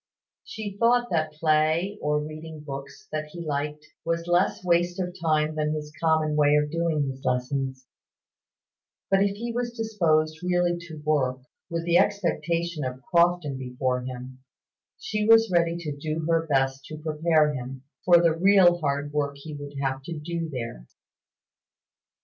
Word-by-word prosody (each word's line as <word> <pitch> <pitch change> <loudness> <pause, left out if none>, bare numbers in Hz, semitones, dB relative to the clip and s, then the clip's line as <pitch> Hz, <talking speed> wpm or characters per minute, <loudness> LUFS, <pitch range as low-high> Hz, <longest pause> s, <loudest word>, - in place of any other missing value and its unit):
She 205 -3 -6
thought 240 +1 +3
that 155 -2 0
play, 155 +6 +1
or 150 0 +1
reading 155 +1 -7
books 140 -2 -8
that 155 0 -2
he 170 +3 -9
liked, 150 0 -3 0.2
was 165 0 -1
less 175 +2 +1
waste 175 0 +2
of 180 -1 -3
time 155 -1 +2
than 155 0 -1
his 150 0 -6
common 160 -2 +2
way 150 -1 +4
of 150 0 +1
doing 165 -3 0
his 135 0 -6
lessons; 130 +1 -2 1.3
but 195 0 +4
if 200 0 +2
he 235 +3 -4
was 240 0 -3
disposed 160 -8 +1
really 175 -1 +1
to 160 -2 -9
work, 130 -4 +1 0.3
with 165 0 -3
the 175 0 +4
expectation 170 -5 0
of 130 0 -5
Crofton 170 -5 +2
before 125 0 -1
him, 130 +1 -8 0.6
she 210 0 -2
was 225 -2 +6
ready 170 -1 +2
to 155 -4 -5
do 155 +2 -3
her 165 -1 +1
best 135 -1 +1
to 155 - -8
prepare 155 0 +2
him 130 0 -6 0.2
for 175 -1 +7
the 170 -1 +3
real 180 -1 +5
hard 145 -1 -2
work 145 -1 -1
he 150 +2 -9
would 145 0 -8
have 135 0 -1
to 170 -2 -5
do 165 +1 -4
there. 115 - -6
155 Hz, 160 wpm, -26 LUFS, 145-175 Hz, 1.3 s, for